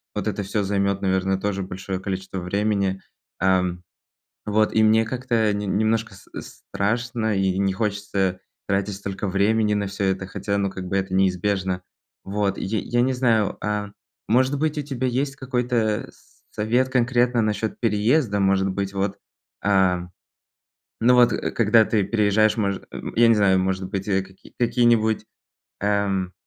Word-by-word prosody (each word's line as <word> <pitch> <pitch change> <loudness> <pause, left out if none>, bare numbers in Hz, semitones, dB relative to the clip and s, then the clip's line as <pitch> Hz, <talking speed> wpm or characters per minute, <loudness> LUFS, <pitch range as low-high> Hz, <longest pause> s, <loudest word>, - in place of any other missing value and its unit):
Вот - - -2
это 100 - -2
всё 100 +2 -1
займет, 100 0 0
наверное, 95 0 +1
тоже 100 0 -2
большое 95 0 -5
количество 95 0 -4
времени. 100 +1 -1 0.4
Ам, 90 -1 +1 0.6
вот, 110 +1 +1
и 110 - +4
мне 110 +1 +5
как-то 115 -3 0
не 105 0 -3
немножко 110 +2 0
с - - -17
страшно, 115 +1 -2
и 95 -1 +1
не 95 -1 +1
хочется 100 -3 -1 0.3
тратить 100 0 -1
столько 100 0 -5
времени 105 +2 +2
на 100 -1 -1
всё 100 0 -3
это, 95 0 -1
хотя, 100 +1 -3
ну, 100 -1 0
как 95 -1 -7
бы 95 - -2
это 95 -1 -2
неизбежно, 95 0 0 0.4
вот. 100 0 -1
Й - - -4 0.2
я 120 +4 0
не 130 +1 +2
знаю, 115 -5 +1
а 105 -1 -2 0.4
может 130 +5 +2
быть, 155 -1 0
у 150 - 0
тебя 130 -2 -2
есть 135 +3 -1
какой-то 125 -4 -1
с - - -27
совет 120 +5 +1
конкретно 125 -1 +2
насчёт 110 0 -1
переезда. 110 +1 +1
Может 95 0 +2
быть, 100 +1 -3
вот, 100 0 -2 0.5
а, 95 -3 +2 0.9
ну 120 +2 +5
вот 120 -1 +6 0.2
когда 110 0 +5
ты 110 -3 +1
переезжаешь, 110 +1 +2
может, 100 -3 -1
м, - - -7
я 115 0 +6
не 115 - +6
знаю, 95 -2 +4
может 95 0 -1
быть, 95 -2 -3
какие 95 -1 -3
какие-нибудь 115 -2 +2 0.6
эм. 100 -2 0
100 Hz, 155 wpm, -23 LUFS, 95-115 Hz, 0.9 s, вот